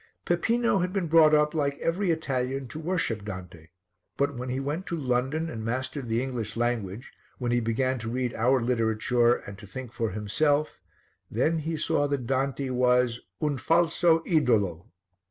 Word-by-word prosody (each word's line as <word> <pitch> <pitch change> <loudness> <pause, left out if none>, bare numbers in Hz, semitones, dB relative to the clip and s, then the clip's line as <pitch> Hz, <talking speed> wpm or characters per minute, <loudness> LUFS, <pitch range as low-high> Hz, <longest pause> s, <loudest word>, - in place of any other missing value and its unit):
Peppino 225 +5 +2
had 180 0 -1
been 190 -2 -1
brought 155 -1 +6
up, 150 0 +3
like 140 -3 0
every 180 +3 0
Italian, 135 -4 -1
to 155 - -6
worship 160 - -1
Dante, 90 -5 -8 0.5
but 140 0 +1
when 125 +1 -5
he 130 +1 -1
went 150 +7 -3
to 170 - -2
London 135 +4 0
and 115 -7 -6
mastered 130 +2 -3
the 115 +2 +1
English 120 -5 -4
language, 115 -2 -2 0.2
when 120 -2 -2
he 120 - +3
began 125 +3 0
to 115 0 -5
read 125 0 -1
our 125 +4 +3
literature 120 0 +2
and 100 -4 -9
to 100 - -11
think 125 +2 -8
for 115 -2 -1
himself, 145 +10 0 0.5
then 155 +9 +1
he 160 +1 -3
saw 155 -2 +1
that 140 -4 -2
Dante 135 +1 -1
was 125 -1 +2 0.2
"un 145 -3 0
falso 165 +1 +3
idolo." 105 - +1
130 Hz, 170 wpm, -27 LUFS, 115-155 Hz, 0.5 s, brought